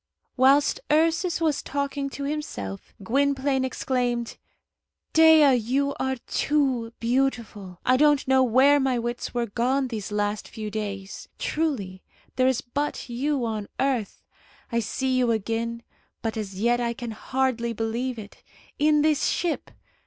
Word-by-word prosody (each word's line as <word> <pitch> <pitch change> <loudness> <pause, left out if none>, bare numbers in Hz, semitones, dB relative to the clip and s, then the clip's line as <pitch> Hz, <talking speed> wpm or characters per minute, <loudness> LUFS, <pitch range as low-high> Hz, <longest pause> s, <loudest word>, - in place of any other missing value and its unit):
Whilst 275 +3 +4
Ursus 330 +3 +2
was 315 -4 +1
talking 280 0 -3
to 280 - -6
himself, 275 - -5
Gwynplaine 275 +3 +1
exclaimed, 245 -2 -1 0.8
"Dea, 320 -3 +7
you 260 +4 +1
are 265 0 0
too 265 -6 0
beautiful! 230 -7 -1
I 255 +1 +4
don't 295 -1 +3
know 265 0 +4
where 260 +4 +5
my 265 -2 +1
wits 240 +1 -4
were 240 -1 +1
gone 255 +5 0
these 215 -4 -5
last 205 0 -1
few 215 -1 -6
days. 200 -2 -5
Truly, 225 -13 -2 0.3
there 255 0 +3
is 260 -1 +1
but 285 +2 -3
you 265 +2 -1
on 215 -2 -3
earth. 255 -7 -1 0.5
I 235 - +1
see 260 +4 -1
you 250 -2 +2
again, 230 +2 -2 0.4
but 225 -1 -2
as 195 -3 -5
yet 240 +3 +2
I 235 -1 0
can 240 -2 -6
hardly 240 +1 -1
believe 230 +3 -2
it. 210 -2 -11 0.4
In 300 0 +4
this 305 -2 +2
ship! 345 -3 -1
255 Hz, 140 wpm, -25 LUFS, 225-280 Hz, 0.8 s, Dea